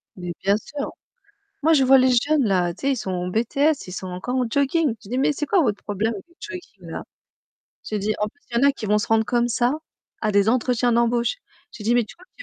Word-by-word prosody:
Mais 180 -2 -5
bien 200 +1 +4
sûr. 280 +5 -6 0.7
Moi 325 +2 +5
je 280 -4 +5
vois 265 +1 +7
les 260 0 +4
jeunes 285 +4 +3
là, 180 -4 +1
tu 195 - -17
sais, - - +4
ils - - +1
sont 195 -4 -4
en 180 -1 -2
BTS, 275 +8 +1
ils 180 - -7
sont 185 - -5
encore 185 +8 -4
en 255 - +1
jogging. 280 +2 +2
Je 195 - -13
dis: 250 - -1
«Mais 270 - +3
c'est 295 +1 -3
quoi 370 +4 +3
votre 210 -8 0
problème 210 +3 -1
avec 200 - -8
les 340 - -27
jogging 365 -4 -9
là?» - - -5 0.8
j'ai 215 - -3
dit: 210 +2 0
«En 210 - +1
plus 285 +7 -17
il 235 - 0
y 260 - +4
en - - +7
a - - +5
qui 235 -5 -7
vont 210 +1 +3
se 210 - -2
rendre 220 0 +3
comme 240 0 +1
ça 240 +2 +1 0.5
à 215 - +1
des 200 +1 +4
entretiens 245 0 +2
d'embauche». 235 - +2 0.4
J'ai 215 - -10
dit: 235 +3 +2
«Mais 245 - +4
tu 215 - -13
crois 360 +2 -18
que - - -67
235 Hz, 265 wpm, -23 LUFS, 210-275 Hz, 0.8 s, vois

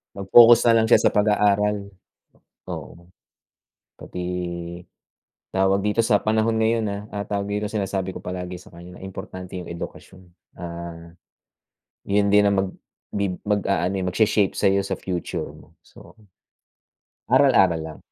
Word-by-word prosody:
Mag-focus 115 +4 +7
na 115 - +6
lang 110 - +2
siya - - +6
sa - - +5
pag-aaral, 105 -1 +1 0.8
oo. 85 +1 -10 0.9
Pati 90 - -7 1.3
tawag 95 +1 +1
dito 105 +2 -1
sa 105 -3 +3
panahon 110 +1 +1
ngayon, 110 0 +1
ah, 100 0 -4
ah, 100 -1 -4
tawag 100 0 -3
dito, 105 +1 -1
sinasabi 95 -3 -3
ko - - -8
palagi 90 0 -5
sa - - -17
kanya 85 +1 -12
na - - -15
importante 95 -1 -8
yung 90 - -8
edukasyon. 90 +2 -9 0.3
Ah, 85 -1 -8 1.0
yun 100 0 +2
din 105 0 +5
ang 100 -1 +2
magbi 95 0 -5
mag-aano, 100 -2 0
eh, 95 - -2
magshe-shape 105 +1 +2
sa'yo 100 0 +1
sa - - -2
future 90 -2 -4
mo. - - -17
So, - - -17 1.1
aral-aral 85 -4 +4
lang. 80 -1 -8
100 Hz, 135 wpm, -23 LUFS, 90-105 Hz, 1.3 s, Mag-focus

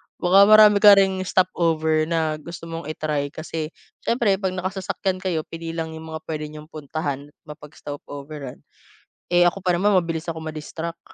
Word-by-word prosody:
Baka 195 +3 +5
marami 215 -1 +7
ka 205 -1 +9
ring 190 -1 +2
stop 185 0 +2
over 160 -1 +2
na 160 -2 -1
gusto 170 +2 -10
mong 165 -2 -6
i-try, 150 -2 -2
kasi 155 +1 -5 0.3
siyempre 220 -5 +1
pag 190 -2 -2
nakasasakyan 185 0 -3
kayo 180 -4 -2
pili 165 0 -7
lang 160 -1 -3
yung 160 0 -9
mga 160 - -7
puwede 155 -1 -4
niyong 155 +1 -12
puntahan, 145 -2 -4
at 145 - -23
mapag-stop 150 -1 -9
overan. 140 -2 -8 0.8
Eh, 175 0 +6
ako 195 +2 -5
pa 180 - +3
naman, 195 +3 +2
mabilis 165 -2 -1
ako 160 -1 -4
ma-distract, 160 +2 -6
165 Hz, 170 wpm, -23 LUFS, 155-185 Hz, 0.8 s, ka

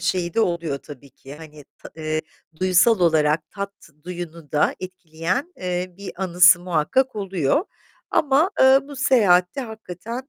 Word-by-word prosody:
şeyi 170 0 -1
de - - +2
oluyor 170 -8 -1
tabii 140 -1 -13
ki. 135 +2 -13
Hani, 150 -1 -13
ta - - -12
eee, 155 0 -2 0.4
duyusal 185 +4 +4
olarak, 155 -2 +2
tat 200 -1 -6 0.3
duyunu 170 -3 -8
da 150 - +2
etkileyen, 185 - -4
eee, 180 0 -4
bir 200 0 -8
anısı 180 -1 +5
muhakkak 180 - 0
oluyor. 195 - 0 0.5
Ama, 295 +5 +2
eee, 265 0 +7
bu 280 +1 -11
seyahatte 205 -6 +3
hakikaten 225 +2 -8
180 Hz, 140 wpm, -22 LUFS, 160-220 Hz, 0.5 s, eee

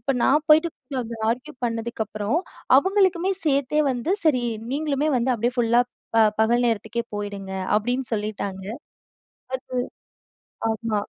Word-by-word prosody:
இப்ப 240 - -2
நான் 295 +3 +3
போயிட்டு 315 +2 +6 0.3
கொஞ்சம் 230 -3 -4
ஆர்கியு 250 +6 -2
பண்ணதுக்கப்புறம் 225 +1 -2 0.4
அவுங்களுக்குமே 380 +2 +3
சேர்த்தே 285 0 +2
வந்து 250 +7 -1
சரி, 260 -6 +3 0.3
"நீங்களுமே 295 0 0
வந்து 250 +1 +1
அப்டியே 240 +2 -1
ஃபுல்லா 235 0 +4 0.6
பகல் 240 +2 +3
நேரத்துக்கே 230 +1 -1
போயிடுங்க" 200 -2 -5 0.2
அப்டின்னு 245 +3 -1
சொல்லிட்டாங்க. 200 -2 -4 0.9
அது 255 -1 -4 0.9
ஆமா. 220 -1 -1
240 Hz, 115 wpm, -24 LUFS, 220-285 Hz, 0.9 s, போயிட்டு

